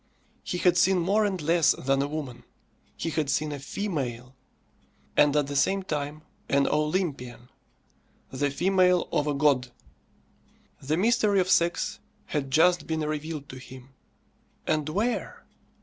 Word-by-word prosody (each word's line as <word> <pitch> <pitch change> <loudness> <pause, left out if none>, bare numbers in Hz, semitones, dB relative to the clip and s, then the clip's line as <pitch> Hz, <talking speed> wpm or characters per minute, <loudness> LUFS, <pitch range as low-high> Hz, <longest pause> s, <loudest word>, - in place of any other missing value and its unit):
He 180 - -3
had 175 0 +3
seen 190 +2 +4
more 200 +5 +2
and 195 -3 -1
less 165 0 +3
than 135 +1 0
a 140 - 0
woman; 145 -5 -6 0.5
he 165 - -3
had 150 -2 -1
seen 150 +1 0
a 145 - -5
female. 135 - -4 0.8
And 150 0 +4
at 150 -1 +3
the 145 +1 -6
same 195 +7 +2
time 150 -2 -4 0.3
an 140 0 +3
Olympian. 150 -7 -2 0.8
The 140 +2 0
female 180 +3 +2
of 150 - 0
a 145 - 0
god. 140 -3 +2 1.1
The 150 +4 -1
mystery 210 0 +3
of 185 0 +1
sex 170 -1 +1 0.3
had 140 -3 -3
just 165 +3 +3
been 160 -1 -1
revealed 155 -1 -4
to 130 - -9
him. 130 0 -12 0.8
And 155 -1 0
where? 215 +9 -2
155 Hz, 145 wpm, -26 LUFS, 140-180 Hz, 1.1 s, seen